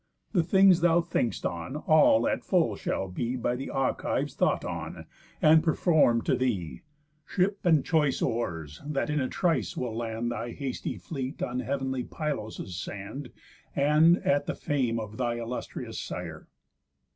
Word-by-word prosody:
The 185 Hz, -, +3 dB
things 190 Hz, +1 st, +5 dB
thou 170 Hz, 0 st, +5 dB
think'st 165 Hz, -8 st, -1 dB
on, 85 Hz, -, -3 dB
all 150 Hz, -7 st, +4 dB
at -, -, -1 dB
full -, -, +2 dB
shall 95 Hz, -, -2 dB
be 115 Hz, +7 st, -3 dB
By 120 Hz, 0 st, -1 dB
th' 135 Hz, -, -5 dB
Achives 135 Hz, -1 st, -1 dB
thought -, -, +1 dB
on, -, -, -5 dB, 0.4 s
and 155 Hz, +1 st, +7 dB
perform'd 155 Hz, -8 st, +3 dB
to -, -, +2 dB
thee; 105 Hz, -11 st, -2 dB, 0.5 s
Ship, 195 Hz, +2 st, +1 dB
and 160 Hz, -5 st, +4 dB
choice 150 Hz, -4 st, +2 dB
oars, 80 Hz, -, -3 dB
that 150 Hz, 0 st, -2 dB
in 150 Hz, -, +1 dB
a 130 Hz, -, 0 dB
trice 175 Hz, -3 st, 0 dB
will 120 Hz, -3 st, -3 dB
land 115 Hz, 0 st, -2 dB
Thy 120 Hz, +1 st, -4 dB
hasty 135 Hz, -3 st, -4 dB
fleet 135 Hz, -3 st, -5 dB
on 125 Hz, 0 st, -2 dB
heav'nly 130 Hz, 0 st, -2 dB
Pylos' 110 Hz, -, -4 dB
sand, 100 Hz, +8 st, -6 dB, 0.5 s
And 150 Hz, +4 st, +5 dB
at 140 Hz, 0 st, +2 dB
the -, -, -2 dB
fame 125 Hz, -6 st, 0 dB
of 110 Hz, 0 st, -7 dB
thy 120 Hz, -2 st, 0 dB
illustrious 120 Hz, +1 st, -5 dB
sire." -, -, -6 dB
130 Hz, 155 wpm, -28 LUFS, 115-155 Hz, 0.5 s, and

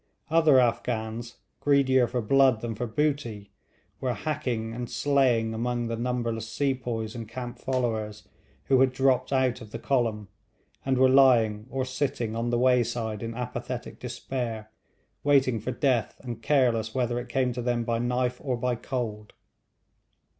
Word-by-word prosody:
Other 160 Hz, -5 st, +6 dB
Afghans, 115 Hz, -1 st, -1 dB, 0.2 s
greedier 130 Hz, -3 st, +3 dB
for 120 Hz, 0 st, -2 dB
blood 130 Hz, -1 st, +4 dB
than 120 Hz, -1 st, -3 dB
for 120 Hz, +3 st, -4 dB
booty, 120 Hz, -5 st, -2 dB, 0.5 s
were 125 Hz, -2 st, -1 dB
hacking 120 Hz, -3 st, -3 dB
and 120 Hz, 0 st, -5 dB
slaying 125 Hz, -6 st, +2 dB
among 120 Hz, +1 st, -2 dB
the 115 Hz, -, -1 dB
numberless 115 Hz, -2 st, -2 dB
sepoys 120 Hz, -5 st, -2 dB
and 115 Hz, -3 st, -7 dB
camp 120 Hz, 0 st, -6 dB
followers 110 Hz, -5 st, -2 dB, 0.4 s
who 130 Hz, -, +3 dB
had 130 Hz, -1 st, +4 dB
dropped 130 Hz, 0 st, +2 dB
out 130 Hz, -2 st, +1 dB
of 110 Hz, -, -10 dB
the -, -, -6 dB
column, 115 Hz, -6 st, 0 dB, 0.6 s
and 135 Hz, -1 st, +1 dB
were 130 Hz, +1 st, +6 dB
lying 120 Hz, -5 st, +4 dB
or 130 Hz, 0 st, -2 dB
sitting 130 Hz, -4 st, -2 dB
on 115 Hz, +1 st, -1 dB
the 120 Hz, -, +1 dB
wayside 120 Hz, -3 st, +1 dB
in 115 Hz, 0 st, -5 dB
apathetic 125 Hz, 0 st, -5 dB
despair, 115 Hz, -5 st, -5 dB, 0.5 s
waiting 135 Hz, -5 st, +3 dB
for 110 Hz, -, -5 dB
death 125 Hz, -2 st, 0 dB
and 120 Hz, -3 st, -6 dB
careless 120 Hz, -6 st, +2 dB
whether 120 Hz, -2 st, 0 dB
it 120 Hz, 0 st, -8 dB
came 125 Hz, 0 st, +1 dB
to 125 Hz, -, -4 dB
them 120 Hz, -1 st, 0 dB
by 115 Hz, 0 st, -1 dB
knife 125 Hz, +1 st, -1 dB
or 130 Hz, -4 st, -1 dB
by 125 Hz, +1 st, 0 dB
cold. 115 Hz, -3 st, -4 dB
120 Hz, 155 wpm, -27 LUFS, 115-130 Hz, 0.6 s, Other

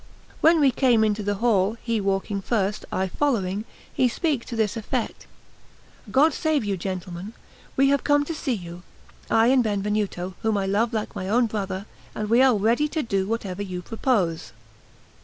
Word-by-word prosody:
When 325 Hz, +1 st, +5 dB
we 280 Hz, -3 st, +5 dB
came 245 Hz, -3 st, +3 dB
into 210 Hz, 0 st, +1 dB
the 205 Hz, 0 st, -1 dB
hall, 215 Hz, -1 st, +2 dB
he 230 Hz, -2 st, 0 dB
walking 195 Hz, 0 st, -1 dB
first, 205 Hz, -1 st, -1 dB
I 190 Hz, 0 st, 0 dB
following, 205 Hz, -4 st, -1 dB, 0.3 s
he 255 Hz, -, +3 dB
speak 280 Hz, 0 st, -1 dB
to 240 Hz, -, -6 dB
this 220 Hz, -2 st, 0 dB
effect: 225 Hz, -2 st, -3 dB, 0.8 s
"God 295 Hz, +4 st, +4 dB
save 315 Hz, -5 st, 0 dB
you, 200 Hz, -1 st, 0 dB
gentlemen; 185 Hz, +2 st, -5 dB, 0.4 s
we 275 Hz, +1 st, +5 dB
have 280 Hz, 0 st, +2 dB
come 290 Hz, 0 st, +3 dB
to 330 Hz, -, -4 dB
see 275 Hz, -5 st, -2 dB
you, 175 Hz, -3 st, -8 dB, 0.5 s
I 225 Hz, +2 st, +4 dB
and 260 Hz, -1 st, +4 dB
Benvenuto, 205 Hz, -3 st, -1 dB
whom 220 Hz, -2 st, +1 dB
I 195 Hz, -, 0 dB
love 210 Hz, +4 st, +1 dB
like 220 Hz, -3 st, -3 dB
my 185 Hz, -, -4 dB
own 240 Hz, +3 st, +3 dB
brother; 200 Hz, -3 st, -3 dB, 0.3 s
and 215 Hz, 0 st, -3 dB
we 240 Hz, +2 st, +6 dB
are 260 Hz, -3 st, +5 dB
ready 235 Hz, +9 st, +2 dB
to 310 Hz, 0 st, -2 dB
do 195 Hz, -4 st, -1 dB
whatever 205 Hz, -4 st, -3 dB
you 185 Hz, -3 st, -5 dB
propose." 185 Hz, -, -1 dB
215 Hz, 175 wpm, -24 LUFS, 195-245 Hz, 0.8 s, we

